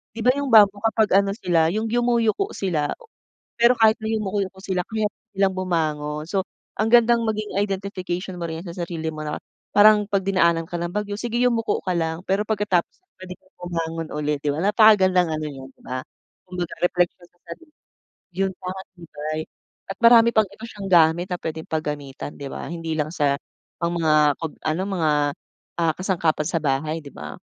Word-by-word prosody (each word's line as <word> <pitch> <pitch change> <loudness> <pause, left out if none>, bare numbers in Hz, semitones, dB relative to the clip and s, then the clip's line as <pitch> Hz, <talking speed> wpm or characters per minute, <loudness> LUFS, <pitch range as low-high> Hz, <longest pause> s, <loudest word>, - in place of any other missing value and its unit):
'di 230 - -7
ba, 250 - +6
yung 285 - -2
bamboo 205 -4 +6
kapag 215 -3 +3
ano 200 0 0
sila, 170 -7 +2
yung 215 +5 -2
yumuyuko 240 - +1
sila. 165 -7 -1 0.6
Pero 235 +1 +5
kahit 220 0 +6
na 220 - -2
yumuko-yuko 200 -3 -2
sila, 185 -2 -2
kaya 220 0 -1 0.2
nilang 195 -1 +1
bumangon. 155 -4 -2
So, 190 +1 0 0.3
ang 220 +1 0
gandang 235 -1 +5
maging 215 -2 -3
identification 190 -2 -3
mo 175 - -6
rin 160 -1 -4
yan 190 - -10
sa 170 +1 -5
sarili 165 -2 -5
mo 155 0 -6
na 150 - -4 0.3
parang 210 0 +6
'pag 195 -1 0
dinaanan 170 -4 +2
ka - - -6
ng 175 0 -3
bagyo, 205 +1 -3
sige 235 +2 -3
yumuko 235 -3 +1
ka 180 - +1
lang, 160 0 -1
pero 195 +2 +1
pagkatapos 210 -5 0 0.2
puwede 185 -1 -9
kang 185 - -32
bumangon 165 -2 -3
ulit, 150 -1 -2
'di 145 - +1
ba? 145 - -3
Napakagandang 190 -4 +4
ano 155 - -4
yun, 135 -2 -9
'di - - -29
ba, 130 0 -4 0.4
kumbaga 180 -2 -5
repleksyon 175 0 0
sa 175 - -38
sarili. 310 - -11 0.7
Yung 195 0 0
magpapatibay 175 -5 -7 0.5
at 195 - -5
marami 230 -1 +8
pang 215 - +6
ito 220 - -11
siyang 205 -3 -9
gamit 170 +2 +4
na 175 - -3
puwedeng 160 0 -5
paggamitan, 150 -3 -4
'di 140 -1 -7
ba. - - -6
Hindi 165 -1 -5
lang 150 0 0
sa 140 -4 +1 0.4
mga 155 -4 +2
pag 160 -2 -5 0.2
ano, 165 +4 0
mga, 175 -6 0 0.7
ah, 165 -1 +2
kasangkapan 170 -5 0
sa 165 - 0
bahay, 150 +3 -1
'di 145 - -11
ba. 75 -1 -8
180 Hz, 180 wpm, -23 LUFS, 160-210 Hz, 0.7 s, marami